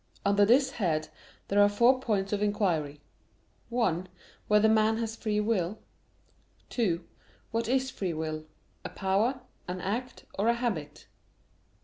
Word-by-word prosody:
Under 200 Hz, 0 st, +4 dB
this 260 Hz, +5 st, +4 dB
head 160 Hz, -, -1 dB, 0.4 s
there 205 Hz, +1 st, +3 dB
are 205 Hz, -, +6 dB
four 240 Hz, +5 st, +4 dB
points 205 Hz, -5 st, -1 dB
of 205 Hz, -, 0 dB
inquiry: 170 Hz, -9 st, 0 dB, 0.7 s
(1) 185 Hz, -7 st, 0 dB, 0.4 s
Whether 210 Hz, +1 st, +5 dB
man 220 Hz, 0 st, +3 dB
has 225 Hz, -1 st, -3 dB
free 215 Hz, -2 st, -1 dB
will? 210 Hz, -3 st, 0 dB, 0.9 s
(2) 180 Hz, -8 st, 0 dB, 0.5 s
What 230 Hz, 0 st, -1 dB
is 260 Hz, +1 st, +1 dB
free 180 Hz, -5 st, -3 dB
will 155 Hz, 0 st, -4 dB, 0.4 s
a -, -, -5 dB
power, 210 Hz, +7 st, 0 dB, 0.3 s
an 180 Hz, +1 st, -4 dB
act, 235 Hz, +8 st, -4 dB
or 210 Hz, -, +2 dB
a 235 Hz, -, +4 dB
habit? 185 Hz, -12 st, -3 dB
205 Hz, 135 wpm, -29 LUFS, 180-230 Hz, 0.9 s, are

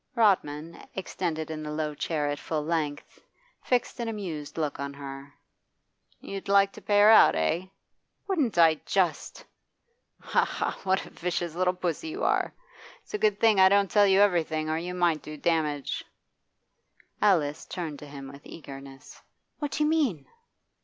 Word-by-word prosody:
Rodman, 165 Hz, -8 st, +1 dB
extended 165 Hz, -4 st, -3 dB
in 155 Hz, -1 st, -5 dB
the 150 Hz, -, -5 dB
low 150 Hz, 0 st, -2 dB
chair 150 Hz, 0 st, -2 dB
at 145 Hz, 0 st, -2 dB
full 155 Hz, -2 st, -3 dB
length, 155 Hz, -3 st, -3 dB, 0.4 s
fixed 250 Hz, 0 st, 0 dB
an 235 Hz, -, -2 dB
amused 175 Hz, -11 st, -5 dB
look 150 Hz, -4 st, -2 dB
on 140 Hz, 0 st, -5 dB
her. 140 Hz, 0 st, -8 dB, 0.9 s
'You'd 195 Hz, -1 st, -7 dB
like 200 Hz, 0 st, +4 dB
to -, -, -12 dB
pay 205 Hz, 0 st, +3 dB
her 210 Hz, +1 st, +8 dB
out, 220 Hz, -, +7 dB
eh?' 160 Hz, -, 0 dB, 0.6 s
'Wouldn't 295 Hz, -, 0 dB
I 160 Hz, -2 st, +5 dB
just!' 180 Hz, -6 st, -1 dB, 0.7 s
'Ha! -, -, +1 dB
ha! -, -, -3 dB
what 190 Hz, 0 st, +1 dB
a -, -, -13 dB
vicious 175 Hz, -1 st, -3 dB
little 180 Hz, +1 st, +1 dB
puss 180 Hz, -, -2 dB
you 330 Hz, +7 st, -5 dB
are! -, -, +1 dB, 0.5 s
It's -, -, -17 dB
a 420 Hz, -, -1 dB
good 210 Hz, -, +2 dB
thing 220 Hz, -3 st, +4 dB
I 190 Hz, 0 st, +8 dB
don't 200 Hz, -1 st, +3 dB
tell 205 Hz, -1 st, +5 dB
you 195 Hz, +1 st, +5 dB
everything, 160 Hz, -5 st, +1 dB
or 160 Hz, -, 0 dB
you 180 Hz, +2 st, -5 dB
might 170 Hz, -4 st, +2 dB
do 150 Hz, 0 st, -8 dB
damage.' 150 Hz, -3 st, -1 dB, 1.2 s
Alice 160 Hz, -8 st, +2 dB
turned 160 Hz, -5 st, -5 dB
to 150 Hz, -, -10 dB
him 140 Hz, -1 st, -9 dB
with 140 Hz, 0 st, -13 dB
eagerness. 135 Hz, -3 st, -11 dB, 0.4 s
'What 295 Hz, -, -2 dB
do 305 Hz, -, +1 dB
you 300 Hz, -, +2 dB
mean? 260 Hz, -, +1 dB
170 Hz, 165 wpm, -27 LUFS, 150-200 Hz, 1.2 s, her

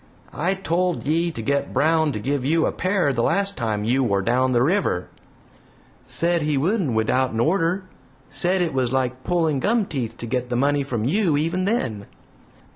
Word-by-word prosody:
"I 180 Hz, +6 st, 0 dB
told 180 Hz, -1 st, -1 dB
ye 165 Hz, +4 st, +1 dB
to 115 Hz, -9 st, -6 dB
get 140 Hz, +4 st, -1 dB
Brown 160 Hz, 0 st, +2 dB
to 105 Hz, -, -3 dB
give 135 Hz, +4 st, -1 dB
you 160 Hz, +4 st, +2 dB
a -, -, 0 dB
pair 185 Hz, -6 st, 0 dB
the 120 Hz, -, 0 dB
last 200 Hz, +9 st, +1 dB
time 110 Hz, -4 st, -2 dB
you 125 Hz, +5 st, +1 dB
war 100 Hz, -5 st, +1 dB
down 130 Hz, +4 st, +2 dB
the 120 Hz, -1 st, +3 dB
river." 160 Hz, -, 0 dB, 1.0 s
"Said 170 Hz, 0 st, 0 dB
he 150 Hz, -1 st, 0 dB
wouldn't 170 Hz, -, 0 dB
without'en 110 Hz, +1 st, +1 dB
order. 175 Hz, +6 st, +1 dB, 0.4 s
Said 180 Hz, +1 st, 0 dB
it 165 Hz, -, -2 dB
was 130 Hz, -2 st, 0 dB
like 130 Hz, -1 st, -1 dB
pulling 165 Hz, -5 st, +1 dB
gum 220 Hz, -, +1 dB
teeth 120 Hz, -9 st, -4 dB
to -, -, -6 dB
get 125 Hz, +1 st, -2 dB
the 125 Hz, -, -1 dB
money 140 Hz, +3 st, +2 dB
from 120 Hz, -5 st, -3 dB
you 170 Hz, -, +2 dB
even 170 Hz, +5 st, 0 dB
then." 120 Hz, -, -2 dB
145 Hz, 185 wpm, -22 LUFS, 125-175 Hz, 1.0 s, the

